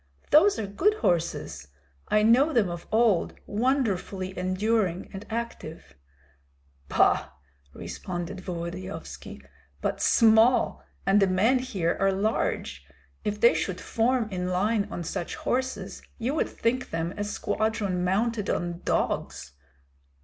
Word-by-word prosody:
"Those 375 Hz, +7 st, +6 dB
are 220 Hz, -, -2 dB
good 295 Hz, -, +1 dB
horses; 170 Hz, -, -1 dB, 0.4 s
I 210 Hz, 0 st, +3 dB
know 250 Hz, +8 st, +5 dB
them 205 Hz, -8 st, +2 dB
of 170 Hz, 0 st, -7 dB
old, 220 Hz, -5 st, +2 dB
wonderfully 205 Hz, -6 st, -1 dB
enduring 185 Hz, 0 st, 0 dB
and 200 Hz, +3 st, -8 dB
active." 220 Hz, -, -6 dB, 1.0 s
"Bah!" -, -, +3 dB, 0.5 s
responded 180 Hz, +1 st, -5 dB
Volodyovski, 180 Hz, +1 st, -7 dB, 0.4 s
"but -, -, -2 dB
small, 225 Hz, +2 st, +4 dB, 0.2 s
and 200 Hz, +1 st, +4 dB
the 195 Hz, -, +5 dB
men 215 Hz, +8 st, +3 dB
here 190 Hz, -10 st, -1 dB
are 195 Hz, 0 st, +3 dB
large. 190 Hz, -, -1 dB, 0.4 s
If 210 Hz, 0 st, -2 dB
they 235 Hz, +2 st, +6 dB
should 185 Hz, -2 st, -2 dB
form 235 Hz, +2 st, +1 dB
in 180 Hz, -1 st, -2 dB
line 200 Hz, +3 st, +1 dB
on 175 Hz, -, -5 dB
such 170 Hz, +1 st, -4 dB
horses, 260 Hz, +1 st, -3 dB, 0.2 s
you 240 Hz, +4 st, -1 dB
would 315 Hz, -, 0 dB
think 250 Hz, +3 st, -1 dB
them 165 Hz, +2 st, -2 dB
a 205 Hz, -, -2 dB
squadron 205 Hz, -3 st, -1 dB
mounted 210 Hz, +3 st, 0 dB
on 175 Hz, 0 st, -2 dB
dogs. 65 Hz, 0 st, -1 dB
205 Hz, 125 wpm, -27 LUFS, 180-230 Hz, 1.0 s, Those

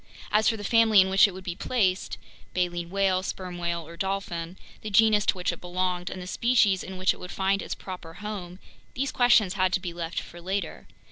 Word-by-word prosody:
As 215 Hz, +1 st, +4 dB
for 225 Hz, -, -1 dB
the 205 Hz, -, -7 dB
family 225 Hz, -1 st, +5 dB
in 190 Hz, 0 st, +4 dB
which 195 Hz, +2 st, +7 dB
it -, -, -5 dB
would 185 Hz, +1 st, -10 dB
be 180 Hz, -2 st, -4 dB
placed 190 Hz, -1 st, 0 dB, 0.4 s
(baleen 175 Hz, -1 st, -1 dB
whale, 190 Hz, -1 st, +1 dB
sperm 180 Hz, -1 st, -6 dB
whale, 170 Hz, -2 st, -3 dB
or 170 Hz, -, -10 dB
dolphin), 185 Hz, -2 st, -3 dB, 0.2 s
the 215 Hz, -, -5 dB
genus 210 Hz, 0 st, +4 dB
to -, -, +3 dB
which 180 Hz, -, 0 dB
it -, -, -9 dB
belonged, 180 Hz, 0 st, -2 dB
and 185 Hz, -, -6 dB
the 180 Hz, -, -7 dB
species 210 Hz, -2 st, +2 dB
in 190 Hz, 0 st, -7 dB
which 185 Hz, 0 st, +2 dB
it -, -, -14 dB
would 180 Hz, -, -8 dB
find 195 Hz, +1 st, 0 dB
its -, -, -4 dB
proper 180 Hz, -3 st, -9 dB
home, 185 Hz, -3 st, -6 dB, 0.4 s
these 270 Hz, +2 st, -1 dB
questions 235 Hz, -6 st, +4 dB
had 185 Hz, -2 st, +1 dB
to -, -, +2 dB
be 180 Hz, -2 st, -5 dB
left 170 Hz, -1 st, -3 dB
for 175 Hz, -, -11 dB
later. 190 Hz, -1 st, -4 dB
185 Hz, 220 wpm, -26 LUFS, 180-200 Hz, 0.4 s, which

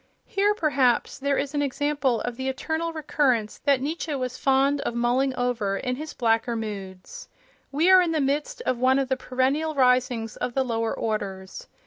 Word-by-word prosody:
Here, 410 Hz, +1 st, +1 dB
perhaps, 280 Hz, -, +1 dB
there 280 Hz, 0 st, 0 dB
is 280 Hz, +1 st, -2 dB
an 290 Hz, -, 0 dB
example 285 Hz, -3 st, 0 dB
of 245 Hz, -1 st, -4 dB
the 260 Hz, +2 st, -3 dB
eternal 320 Hz, +5 st, -2 dB
recurrence 270 Hz, -8 st, 0 dB
that 280 Hz, -3 st, +3 dB
Nietzsche 310 Hz, +1 st, -3 dB
was 255 Hz, -1 st, -3 dB
fond 275 Hz, +2 st, +2 dB
of 235 Hz, -, -3 dB
mulling 250 Hz, +3 st, +1 dB
over 235 Hz, -6 st, -1 dB
in 250 Hz, +2 st, -2 dB
his 305 Hz, +3 st, -7 dB
blacker 230 Hz, 0 st, +1 dB
moods. 195 Hz, -4 st, -7 dB, 0.4 s
We 320 Hz, +7 st, +3 dB
are 375 Hz, -1 st, +8 dB
in 345 Hz, -2 st, 0 dB
the 315 Hz, -, 0 dB
midst 295 Hz, -, -1 dB
of 250 Hz, -, 0 dB
one 260 Hz, +1 st, +4 dB
of 270 Hz, -1 st, -1 dB
the 265 Hz, -, +2 dB
perennial 270 Hz, +5 st, -1 dB
risings 250 Hz, -4 st, +2 dB
of 240 Hz, -, -3 dB
the 265 Hz, -, +2 dB
lower 230 Hz, -2 st, -1 dB
orders. 195 Hz, -4 st, -4 dB
260 Hz, 180 wpm, -25 LUFS, 240-290 Hz, 0.4 s, are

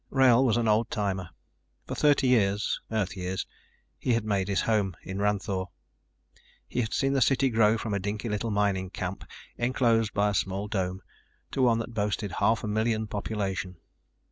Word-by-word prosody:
Wrail 130 Hz, -2 st, +5 dB
was 120 Hz, -3 st, +3 dB
an 115 Hz, -1 st, +1 dB
old 110 Hz, +2 st, +2 dB
timer. 95 Hz, -4 st, -2 dB, 0.6 s
For -, -, -5 dB
thirty 145 Hz, -2 st, +3 dB
years 105 Hz, -4 st, +2 dB
Earth 105 Hz, -4 st, -1 dB
years 95 Hz, 0 st, -3 dB, 0.5 s
he 125 Hz, -, +1 dB
had 115 Hz, -2 st, 0 dB
made 100 Hz, -3 st, 0 dB
his 100 Hz, -1 st, +1 dB
home 105 Hz, -5 st, +1 dB
in 95 Hz, +1 st, -5 dB
Ranthoor. 100 Hz, -2 st, 0 dB, 1.0 s
He 125 Hz, -, -1 dB
had 110 Hz, -2 st, -3 dB
seen 135 Hz, 0 st, +1 dB
the 135 Hz, -, +2 dB
city 135 Hz, +1 st, +3 dB
grow 110 Hz, 0 st, +4 dB
from 110 Hz, -1 st, -3 dB
a 100 Hz, -, 0 dB
dinky 100 Hz, +4 st, -3 dB
little 105 Hz, +1 st, -2 dB
mining 100 Hz, -3 st, 0 dB
camp 95 Hz, 0 st, -5 dB, 0.3 s
enclosed 120 Hz, -3 st, +2 dB
by 105 Hz, +1 st, +3 dB
a -, -, -1 dB
small 95 Hz, +1 st, -1 dB
dome 95 Hz, -3 st, -2 dB, 0.5 s
to 135 Hz, -, -1 dB
one 120 Hz, -3 st, +4 dB
that 115 Hz, +1 st, -5 dB
boasted 105 Hz, -1 st, -1 dB
half 110 Hz, -1 st, +2 dB
a -, -, -2 dB
million 110 Hz, +1 st, 0 dB
population. 100 Hz, -3 st, -3 dB
105 Hz, 175 wpm, -28 LUFS, 100-115 Hz, 1.0 s, Wrail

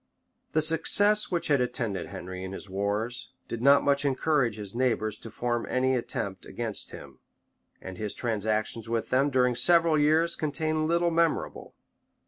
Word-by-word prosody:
The 155 Hz, -, +3 dB
success 205 Hz, +6 st, +4 dB
which 175 Hz, -2 st, -1 dB
had 145 Hz, -3 st, +2 dB
attended 115 Hz, -7 st, -2 dB
Henry 90 Hz, +1 st, -8 dB
in 95 Hz, 0 st, -6 dB
his 95 Hz, -, -8 dB
wars, 100 Hz, +5 st, -3 dB, 0.2 s
did 115 Hz, -, -5 dB
not 140 Hz, +2 st, +5 dB
much 140 Hz, 0 st, +1 dB
encourage 140 Hz, -4 st, +1 dB
his 105 Hz, -2 st, -8 dB
neighbors 115 Hz, -4 st, 0 dB
to 115 Hz, -, -9 dB
form 120 Hz, +1 st, -3 dB
any 130 Hz, +1 st, +1 dB
attempt 100 Hz, -5 st, -3 dB
against 115 Hz, -3 st, -4 dB
him; -, -, -12 dB, 0.6 s
and 95 Hz, -1 st, -9 dB
his 105 Hz, -1 st, -4 dB
transactions 110 Hz, 0 st, -2 dB
with 115 Hz, -1 st, -2 dB
them, 135 Hz, +3 st, +3 dB
during 125 Hz, -2 st, +2 dB
several 165 Hz, +3 st, +4 dB
years, 160 Hz, +3 st, +2 dB
contain 155 Hz, +1 st, -1 dB
little 170 Hz, +1 st, +1 dB
memorable. 165 Hz, -1 st, -1 dB
125 Hz, 155 wpm, -27 LUFS, 110-155 Hz, 0.6 s, not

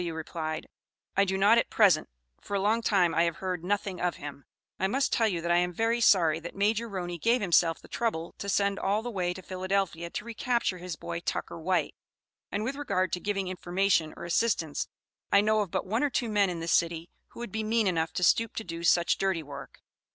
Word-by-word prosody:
W. 170 Hz, -2 st, -3 dB
replied: 160 Hz, -1 st, -4 dB, 0.5 s
"I 200 Hz, -, +4 dB
do 190 Hz, 0 st, -1 dB
not 210 Hz, +4 st, +5 dB
at -, -, -1 dB
present; 195 Hz, -8 st, +4 dB, 0.3 s
for 200 Hz, -, -4 dB
a -, -, +2 dB
long 215 Hz, +4 st, +2 dB
time 185 Hz, -6 st, +3 dB
I 165 Hz, -, +3 dB
have 170 Hz, -2 st, -1 dB
heard 180 Hz, -2 st, -4 dB
nothing 195 Hz, -1 st, -2 dB
of 180 Hz, -1 st, 0 dB
him. 140 Hz, -1 st, -9 dB, 0.3 s
I 190 Hz, -, +2 dB
must 270 Hz, +7 st, 0 dB
tell 225 Hz, -, +3 dB
you 175 Hz, -5 st, -1 dB
that 170 Hz, +1 st, -1 dB
I 175 Hz, -, +5 dB
am 180 Hz, 0 st, +1 dB
very 225 Hz, +5 st, 0 dB
sorry 165 Hz, -7 st, +4 dB
that 170 Hz, +1 st, -8 dB
Major 220 Hz, +3 st, +1 dB
Roney 175 Hz, -3 st, -4 dB
gave 235 Hz, +8 st, +3 dB
himself 170 Hz, -4 st, +3 dB
the -, -, -15 dB
trouble 170 Hz, -8 st, -2 dB
to 200 Hz, -, -4 dB
send 200 Hz, 0 st, +1 dB
all 205 Hz, +3 st, 0 dB
the 245 Hz, -, -4 dB
way 180 Hz, -4 st, -1 dB
to 185 Hz, -, -9 dB
Philadelphia 185 Hz, -2 st, -2 dB
to 210 Hz, -, -5 dB
re 235 Hz, -, -6 dB
capture 235 Hz, -6 st, 0 dB
his 180 Hz, -1 st, -5 dB
'boy 170 Hz, -, -5 dB
Tucker 170 Hz, -, -4 dB
White,' 180 Hz, +2 st, 0 dB, 0.6 s
and 205 Hz, -, -1 dB
with 265 Hz, +5 st, -3 dB
regard 185 Hz, -, 0 dB
to 180 Hz, -, 0 dB
giving 195 Hz, -1 st, -2 dB
information 180 Hz, -2 st, +1 dB
or -, -, -7 dB
assistance, 170 Hz, -3 st, 0 dB, 0.4 s
I 200 Hz, -, +6 dB
know 215 Hz, +1 st, +2 dB
of 200 Hz, -, -3 dB
but -, -, -2 dB
one 220 Hz, +5 st, 0 dB
or 290 Hz, -, +2 dB
two 245 Hz, -3 st, -1 dB
men 205 Hz, -2 st, +3 dB
in 170 Hz, -2 st, -4 dB
this 165 Hz, -, -2 dB
city 170 Hz, 0 st, 0 dB, 0.2 s
who -, -, -14 dB
would 240 Hz, -4 st, -6 dB
be 220 Hz, +2 st, -2 dB
mean 220 Hz, 0 st, +1 dB
enough 165 Hz, -3 st, 0 dB
to 180 Hz, -, -2 dB
stoop 225 Hz, +5 st, +3 dB
to 225 Hz, -, -3 dB
do 170 Hz, -3 st, -6 dB
such 170 Hz, 0 st, +3 dB
dirty 190 Hz, -4 st, 0 dB
work. 140 Hz, -1 st, -10 dB
185 Hz, 230 wpm, -28 LUFS, 170-215 Hz, 0.6 s, I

